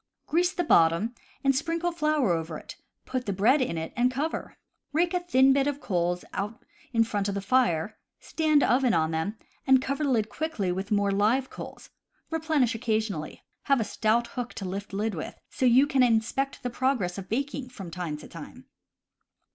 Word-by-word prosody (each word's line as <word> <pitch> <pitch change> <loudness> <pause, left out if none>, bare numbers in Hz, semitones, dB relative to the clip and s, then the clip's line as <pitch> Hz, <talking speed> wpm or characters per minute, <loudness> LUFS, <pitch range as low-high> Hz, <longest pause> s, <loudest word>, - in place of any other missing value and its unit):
Grease 350 +4 +2
the 355 - -1
bottom 170 - +3 0.3
and 275 -1 +3
sprinkle 330 +4 -1
flour 305 - +1
over 165 -1 -2
it, - - -10 0.3
put 255 -2 -3
the - - +1
bread 235 +10 +4
in 205 -10 -1
it, 160 0 -4
and 245 +1 +3
cover. 285 +5 -3 0.4
Rake 340 +3 +2
a 360 - +2
thin 270 -7 +4
bed 275 0 +2
of 290 -1 -2
coals 175 -5 -1
out 210 +3 -4 0.3
in 230 -2 +4
front 205 -3 -1
of 200 - -2
the - - -1
fire, 200 -4 +1 0.2
stand 310 -3 +2
oven 250 -1 +3
on 160 0 +1
them, 160 +7 -2 0.3
and 265 0 +7
cover 275 +3 -2
the 285 - +1
lid 220 -4 0
thickly 305 - -2
with 190 +3 -3
more 205 -2 +2
live 220 +7 +2
coals. - - -9 0.4
Replenish 315 -6 +1
occasionally. 220 -8 -2 0.2
Have 275 -2 +3
a - - +1
stout 225 +2 +1
hook 245 0 -5
to 195 - -5
lift 200 +3 -5
lid 210 +2 -1
with, 155 - -5 0.2
so 255 - +1
you 250 +3 +6
can 275 -2 +2
inspect 245 +3 +1
the 245 - -2
progress 235 -8 0
of 190 -1 -9
baking 275 +2 -2
from 195 -8 -9
time 170 -4 -4
to - - -11
time. - - -11
235 Hz, 190 wpm, -27 LUFS, 195-275 Hz, 0.4 s, and